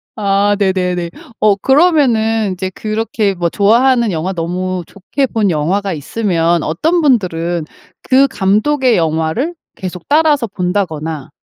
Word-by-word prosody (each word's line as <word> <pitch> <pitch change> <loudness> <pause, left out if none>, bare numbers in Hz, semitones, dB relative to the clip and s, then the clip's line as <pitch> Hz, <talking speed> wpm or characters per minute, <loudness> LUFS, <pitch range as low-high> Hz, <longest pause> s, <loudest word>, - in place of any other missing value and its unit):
아 205 -1 +1
네네네. 180 -3 -1 0.3
어 210 -2 +4
그러면은 235 - +2
인제 185 +1 -4
그렇게 215 -1 -2
뭐 175 -1 -1
좋아하는 235 +3 +3
영화 175 +4 -2
너무 180 +1 -3
좋게 255 +8 -3
본 215 -6 0
영화가 185 +6 -1
있으면 170 0 0
어떤 320 - 0
분들은 175 - 0 0.4
그 270 +1 +3
감독의 240 +4 +1
영화를 160 - -1 0.2
계속 180 -2 -7
따라서 295 -5 +3
본다거나 175 -6 -3
195 Hz, 280 characters per minute, -15 LUFS, 175-235 Hz, 0.4 s, 어